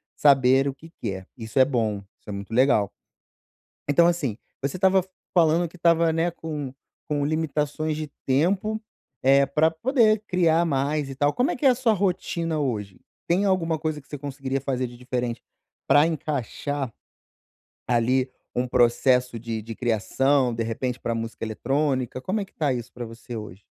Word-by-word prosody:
saber 135 -1 +5
o 140 - -1
que 160 +4 -15
quer. 95 -4 -4
Isso 115 +2 -2
é 130 - +8
bom, 115 -6 0 0.2
isso - - -15
é - - -3
muito 100 +2 -6
legal. 115 -5 +3 1.0
Então, 155 +4 +5
assim, 160 -11 0 0.3
você 140 +5 -2
estava 190 0 +4 0.3
falando 170 0 +4
que 170 - -16
estava, 170 -1 +3
né, 165 +2 +1
com 150 -5 -5 0.4
com 145 -1 +1
limitações 155 0 -1
de 155 0 -3 0.2
tempo, 185 +10 +1 0.4
eh, 135 +1 +5
para 150 +4 +3
poder 220 - +2
criar 170 -2 +3
mais 145 0 0
e 135 - -6
tal. 145 +2 +2
Como 250 - +1
é - - -2
que 270 - -6
é 270 - +8
a - - +4
sua 240 -3 +2
rotina 170 -4 -1
hoje? 105 -9 -3 0.3
Tem 185 +4 +2
alguma 170 -4 +1
coisa 155 -1 -2
que 140 - -14
você 145 - -7
conseguiria 135 -1 -3
fazer 130 -1 -1
de 120 - -11
diferente 125 -1 -3 0.4
para 145 +2 +6
encaixar 145 -3 -3 1.0
ali 125 +2 +2 0.2
um 125 +1 0
processo 125 0 +3
de 115 -1 -4
de 115 +1 -7
criação, 125 +3 +1
de 115 - -3
repente 120 +3 -2
para 115 - -2
a - - -3
música 115 0 -4
eletrônica? 130 +2 -1
Como 200 +9 -1
é 195 - -4
que - - -27
está 145 -4 0
isso 120 0 -5
para 120 -1 -6
você 115 +1 -8
hoje? 105 -2 -9
140 Hz, 175 wpm, -25 LUFS, 125-160 Hz, 1.0 s, é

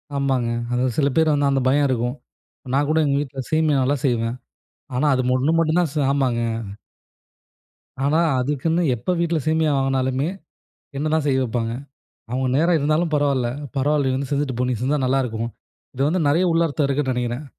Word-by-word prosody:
ஆமாங்க. 135 -4 0 0.2
அது 125 +1 +1
சில 140 -2 +3
பேரு 160 -1 +3
வந்து 145 -1 +2
அந்த 135 -1 +1
பயம் 140 +2 +3
இருக்கும். 120 0 -1 0.6
நான் 145 +1 +2
கூட 155 - +2
எங்க 140 - +1
வீட்ல 135 -2 -5
சேமியா 155 -3 +2
நல்லா 140 +3 +1
செய்வேன். 115 -1 0 0.6
ஆனா 140 +4 +1
அது 130 - +1 0.2
ஒண்ணு 140 +5 +1
மட்டும் 165 +1 +2
தான் 160 - -1
ச - - -5
ஆமாங்க. 130 -4 +1 1.6
ஆனா 150 +3 +2 0.2
அதுக்குன்னு 150 +6 0
எப்போ 120 +11 -3
வீட்ல 170 -1 +1
சேமியா 160 0 +2
வாங்குனாலுமே, 135 +1 0 0.7
என்ன 155 +2 -1
தான் 160 -2 +1
செய்ய 135 -2 +2
வைப்பாங்க. 115 -1 -2 0.6
அவங்க 130 +1 0
நேரம் 170 +2 +3
இருந்தாலும் 155 +3 +1
பரவாயில்ல, 140 -5 +1 0.3
"பரவாயில்ல 140 0 +1
நீ 130 - 0
வந்து 135 -1 -4
செஞ்சுட்டு 140 -3 -1
போ. 125 - +1
நீ 125 - 0
செஞ்சா 140 +3 +1
நல்லாயிருக்கும்." 120 -3 -1 0.5
இது 130 - -3
வந்து 180 +4 +1
நெறைய 165 +6 +3
உள்ளர்த்தம் 165 -3 +1
இருக்குன்னு 140 -1 0
நெனைக்கிறேன். 125 +3 -3
140 Hz, 170 wpm, -22 LUFS, 130-155 Hz, 1.6 s, சில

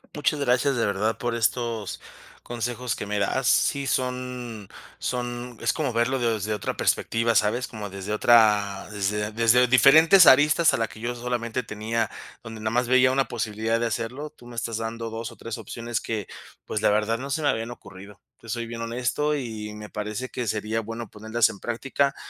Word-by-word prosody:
Muchas 150 0 0
gracias, 135 0 +2
de 115 -3 +1
verdad, 105 +3 -1
por 120 -1 -1
estos 115 -2 -1 0.4
consejos 120 0 -3
que - - -5
me 105 0 -2
das. 120 +5 0
Sí, 140 +3 +2
son 125 -5 -3 0.3
son 120 -1 -4
es - - +2
como 145 -6 -2
verlo 120 +3 +1
desde 110 -4 -1
otra 105 - -3
perspectiva, 115 0 +1
¿sabes? 120 +5 +2
Como 105 -3 -7
desde 100 +2 -6
otra 105 -3 +4
desde 105 +1 -2
desde 115 +3 +4
diferentes 155 +9 +7
aristas 150 +5 +6
a - - +1
la 115 -1 0
que 110 - -13
yo 120 +2 -2
solamente 120 0 -2
tenía, 110 0 -2 0.3
donde 115 -2 -9
nada 110 +1 -2
más 120 0 +1
veía 130 +1 +5
una 135 0 +2
posibilidad 110 0 -1
de 120 - 0
hacerlo, 120 +7 -4
tú 120 -6 -17
me 120 - -10
estás 115 -1 -3
dando 115 0 -4
2 115 +1 -5
o 115 - -13
3 115 0 -6
opciones 115 +2 -4
que, 110 -3 -3 0.4
pues, 105 - -3
la - - +4
verdad, 105 +2 +1
no 135 +2 -6
se 150 +3 -1
me 145 - +3
habían 115 +1 -1
ocurrido, 100 -4 -12 0.2
te 115 - -13
soy 115 +1 -2
bien 115 0 -6
honesto, 125 +6 -1
y 110 -5 -5
me 105 0 -9
parece 105 +4 -4
que 120 -2 -4
sería 110 +2 -1
bueno 115 +1 -6
ponerlas 110 +3 +1
en 100 - -9
práctica. 135 +4 -1
115 Hz, 190 wpm, -25 LUFS, 110-125 Hz, 0.4 s, diferentes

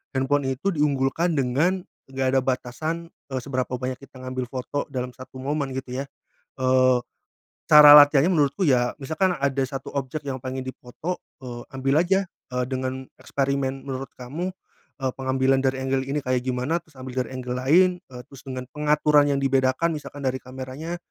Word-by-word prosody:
handphone 135 +1 +1
itu 130 +9 -3
diunggulkan 150 +2 +1
dengan 150 +8 +1 0.2
nggak 135 0 -2
ada - - +6
batasan, 135 +6 -3 0.2
eee, 130 - -1
seberapa 130 -2 -2
banyak 125 0 -4
kita 135 -1 -14
ngambil 130 -1 -3
foto 130 +3 -4
dalam 125 -3 -4
satu 130 +2 -13
momen, 140 -1 -2
gitu 130 0 -4
ya. - - -10 0.5
Eee, 130 0 +4 0.7
cara 150 -1 +10
latihannya 145 +3 +6
menurutku 150 +3 +1
ya, 125 -5 +3
misalkan 160 +7 0
ada 135 -1 0
1 135 +1 -6
objek 140 +2 -3
yang 135 -2 -3
pengen 130 +1 -4
difoto, 130 +7 -6 0.2
eee, 120 -1 -6
ambil 135 +3 +2
aja, 190 +3 +2 0.3
eee, 125 0 0
dengan 130 0 -3 0.2
eksperimen. 135 -1 -1
Menurut 135 -1 -5
kamu, 145 +9 -4 0.5
eee, 130 -1 0
pengambilan 130 0 +2
dari 130 0 0
angle 135 0 0
ini 145 +2 0
kayak 130 -1 +1
gimana? 130 +7 0
Terus 160 -4 -25
ambil 130 0 -4
dari - - -11
angle 125 -1 -4
lain. 165 +9 +5 0.2
Eee, 125 - -8
terus 135 - -13
dengan 130 -1 -4
pengaturan 150 0 +3
yang 140 -1 +1
dibedakan, 135 +4 +2
misalkan 145 -1 -8
dari 130 0 0
kameranya 130 +6 -6
135 Hz, 170 wpm, -24 LUFS, 130-145 Hz, 0.7 s, cara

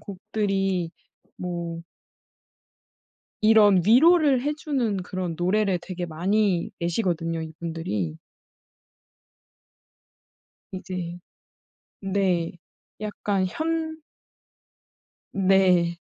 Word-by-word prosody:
곡들이 195 -3 -2 0.5
뭐 170 -2 -4 1.6
이런 210 -4 +6
위로를 285 - +5
해 295 - 0
주는 270 -9 -1
그런 180 -2 -4
노래를 190 +2 +1
되게 180 -1 -5
많이 185 +3 0
내시거든요 170 -2 -1
이분들이. 160 - -4 2.6
이제 180 -2 -5 0.8
네. 190 -4 0 0.5
약간 205 -2 -1
현 320 - -2 1.3
네. 185 -3 +3
185 Hz, 140 characters per minute, -25 LUFS, 170-215 Hz, 2.6 s, 이런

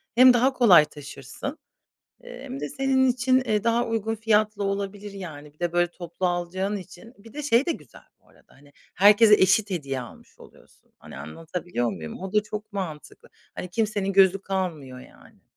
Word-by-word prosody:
hem 255 +1 +8
daha 255 +3 +2
kolay 195 -12 +6
taşırsın, 145 -2 -8 0.7
eee, - - -11
hem 135 - -7
de 145 - -4
senin 265 - +1
için, 255 +1 +2
eee, 210 -2 0
daha 235 +1 +1
uygun 225 -1 -2
fiyatla 215 -1 +1
olabilir, 200 +1 -4
yani. 155 -7 -9
Bir - - -36
de 175 -1 -2
böyle 175 0 +1
toplu 175 +1 -5
alacağın 180 +3 -2
için. 195 +5 -12
Bir 220 +2 -16
de 300 - -6
şey 260 -1 +2
de 340 - +1
güzel - - -14 0.2
bu - - -30
arada, - - -25
hani, 145 +1 -21 0.2
herkese 210 +2 +6
eşit 200 +2 +3
hediye 140 -7 -3
almış 120 - -14
oluyorsun. - - -20
Hani, - - -12
anlatabiliyor 155 - -4
muyum? 80 -6 -8
O 190 0 -7
da 210 -1 +3
çok 210 0 -8
mantıklı. 175 -7 -7 0.3
Hani, 180 - -7
kimsenin 205 -1 -1
gözü 195 0 +4
kalmıyor, 160 -10 -4
yani. - - -18
195 Hz, 175 wpm, -25 LUFS, 170-220 Hz, 0.7 s, hem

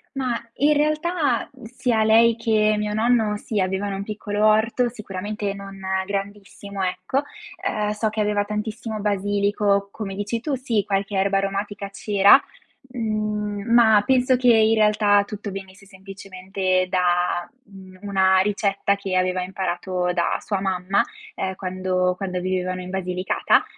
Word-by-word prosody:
Ma, 255 -3 -1 0.2
in 295 +2 +4
realtà 305 -2 0
sia 240 -1 0
lei 225 +1 +5
che 215 -2 +2
mio 210 0 -2
nonno 220 -1 +2
sì, 210 0 -3
avevano 190 +2 -1
un 195 - -4
piccolo 210 0 -2
orto, 220 +3 +3
sicuramente 205 -2 -5
non 195 0 -10 0.3
grandissimo 200 0 -5
ecco, 185 +9 -1 0.4
ehm, 210 -1 0
so 210 +1 -1
che 215 0 -2
aveva 205 -1 +1
tantissimo 215 +1 -4
basilico, 200 0 0
come 200 -3 -6
dici 205 +4 -3
tu, 285 +4 -3
sì, 235 -5 -1
qualche 195 0 -1
erba 195 +1 +2
aromatica 200 +1 -3
c'era, 200 +3 +5 0.5
mhmm, 215 -2 -2
ma 220 -3 +6
penso 255 0 +3
che 250 -1 +3
in 220 0 +4
realtà 210 -1 +4
tutto 205 0 -6
venisse 195 0 -9
semplicemente 190 -1 -3
da, 175 -1 +1
uhm, 190 -3 -14
una 190 -2 +3
ricetta 200 0 0
che 195 -2 -4
aveva 185 0 +1
imparato 180 -1 -2
da 170 -1 0
sua 200 -3 -2
mamma, 190 0 +1 0.3
ehm, 190 0 -3
quando 185 -1 -1
quando 185 -2 -3
vivevano 185 0 -2
in 180 - -8
Basilicata, 185 -1 +1
205 Hz, 140 wpm, -23 LUFS, 190-215 Hz, 0.5 s, ma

